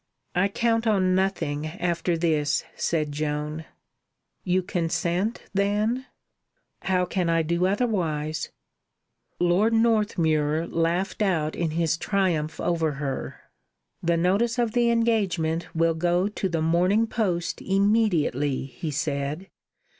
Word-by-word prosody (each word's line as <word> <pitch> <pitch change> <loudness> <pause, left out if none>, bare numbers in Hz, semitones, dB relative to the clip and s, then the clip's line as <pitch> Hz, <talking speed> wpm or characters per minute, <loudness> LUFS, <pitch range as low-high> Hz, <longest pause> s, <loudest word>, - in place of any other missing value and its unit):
"I 180 +2 +3
count 230 +2 0
on 190 -4 +3
nothing 180 -6 0
after 170 +1 -1
this," 155 -3 +1
said 155 -3 -1
Joan. 150 +1 -3 0.8
"You 185 +1 +1
consent, 175 +5 -1
then?" 210 +6 0 0.7
"How 185 -1 +1
can 180 -1 -1
I 165 0 +2
do 170 +3 +1
otherwise?" 170 - -1 0.9
Lord 180 +6 +3
Northmuir 165 -9 +2
laughed 170 +5 -1
out 165 -7 +1
in 170 -2 -1
his 160 0 0
triumph 175 -6 0
over 165 -3 0
her. 140 -1 -4 0.6
"The 170 0 +1
notice 200 +8 +1
of 235 -2 +1
the 240 +1 +2
engagement 195 -8 +1
will 165 0 +3
go 175 +3 +1
to 205 -2 -3
the 165 -2 -1
Morning 180 +7 +3
Post 180 -7 -2
immediately," 190 - +1
he 140 +4 -6
said. 140 +5 -3
175 Hz, 115 wpm, -25 LUFS, 160-200 Hz, 0.9 s, I